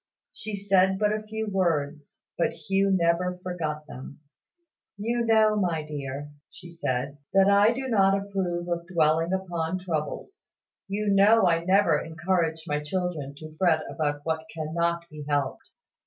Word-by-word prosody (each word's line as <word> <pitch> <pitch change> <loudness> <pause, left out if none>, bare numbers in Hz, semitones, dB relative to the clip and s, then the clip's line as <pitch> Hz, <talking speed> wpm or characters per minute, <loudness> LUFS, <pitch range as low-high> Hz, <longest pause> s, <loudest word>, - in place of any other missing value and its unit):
She 215 -1 -5
said 190 -1 +3
but 210 +1 +2
a 215 - -2
few 220 +1 -4
words; 155 -7 -1
but 170 - 0
Hugh 195 +5 0
never 180 0 +1
forgot 155 -4 -3
them. 135 -1 -10 0.8
"You 235 +3 -1
know, 220 -2 +4
my 175 -6 0
dear," 145 -1 -6 0.2
said 145 -5 -4
she, 140 +6 -19
"that 195 0 +6
I 200 +2 +5
do 265 +2 -4
not 195 -4 +4
approve 185 -3 -3
of 170 -1 -3
dwelling 165 -1 +2
upon 180 -2 -2
troubles. 180 - -5 0.3
You 205 +2 -2
know 205 +2 +6
I 165 -1 +2
never 185 -4 +3
encourage 165 0 -1
my 150 -3 -1
children 150 -3 -3
to 155 0 -10
fret 165 -3 +3
about 145 -2 -2
what 160 0 -1
cannot 170 +2 -2
be 150 -2 -9
helped." 145 -2 -1
175 Hz, 150 wpm, -26 LUFS, 155-195 Hz, 0.8 s, that